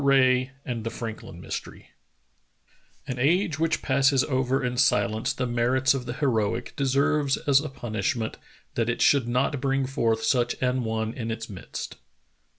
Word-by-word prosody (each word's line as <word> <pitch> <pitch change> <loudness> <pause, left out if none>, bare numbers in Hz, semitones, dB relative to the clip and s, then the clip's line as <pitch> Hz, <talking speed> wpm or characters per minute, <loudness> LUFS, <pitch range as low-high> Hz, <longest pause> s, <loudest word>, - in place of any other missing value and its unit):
RAE 130 -2 +4 0.2
AND 120 -3 -3
THE 115 - -2
FRANKLIN 115 -1 -7
MYSTERY - - -7 1.1
"An 125 -1 -4
age 165 +4 +2
which 165 -1 0
passes 135 0 +3
over 130 -1 0
in 125 0 -1
silence 120 -1 +2
the 130 -1 -2
merits 125 +2 +2
of 130 -2 -4
the 120 - -3
heroic 115 -7 0
deserves 140 +1 +2
as 140 -2 +3
a 155 +1 -4
punishment 110 -2 -3 0.4
that 115 0 0
it 120 - -1
should 140 -5 +4
not 125 +3 0
bring 135 -1 +1
forth 115 -4 0
such 125 -3 +2
an 125 0 0
one 110 0 -2
in 115 -2 -5
its 115 0 -5
midst." 95 - -7
130 Hz, 155 wpm, -26 LUFS, 115-135 Hz, 1.1 s, RAE